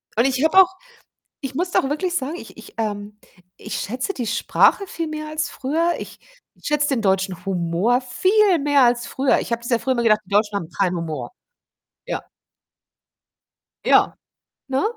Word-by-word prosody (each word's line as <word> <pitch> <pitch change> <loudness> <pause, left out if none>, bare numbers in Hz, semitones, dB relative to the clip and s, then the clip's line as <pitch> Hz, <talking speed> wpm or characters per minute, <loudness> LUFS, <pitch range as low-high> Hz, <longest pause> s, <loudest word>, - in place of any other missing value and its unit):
Und 235 - +3
ich 270 +1 +1
habe 320 +4 +3
auch 370 - +4 0.7
ich 270 -1 -5
muss 355 +4 -1
doch 270 - +2
wirklich 350 +4 -1
sagen, 290 +3 -2
ich - - -11
ich - - -13
ähm, 210 -1 -4 0.4
ich - - -6
schätze 255 - -3
die 240 -3 -3
Sprache 395 - +3
viel 330 -3 -4
mehr 310 0 -5
als 310 0 -2
früher. 325 +6 0
Ich - - -9 0.4
schätze 295 0 +1
den 260 -5 0
deutschen 190 -2 0
Humor 190 +6 +1
viel 375 - +3
mehr 285 -2 +3
als 240 0 +3
früher. 265 0 +1
Ich - - -5
habe 235 0 -1
das 240 - -6
ja 235 - +3
früher 260 - 0
immer 240 - 0
gedacht, 215 -2 +4
die - - -22
Deutschen 205 0 +2
haben 170 -5 -4
keinen 180 +2 0
Humor. 155 -7 -4 0.8
Ja. - - -3 1.7
Ja, - - +4 0.5
ne, 265 +1 0
255 Hz, 175 wpm, -22 LUFS, 210-305 Hz, 1.7 s, auch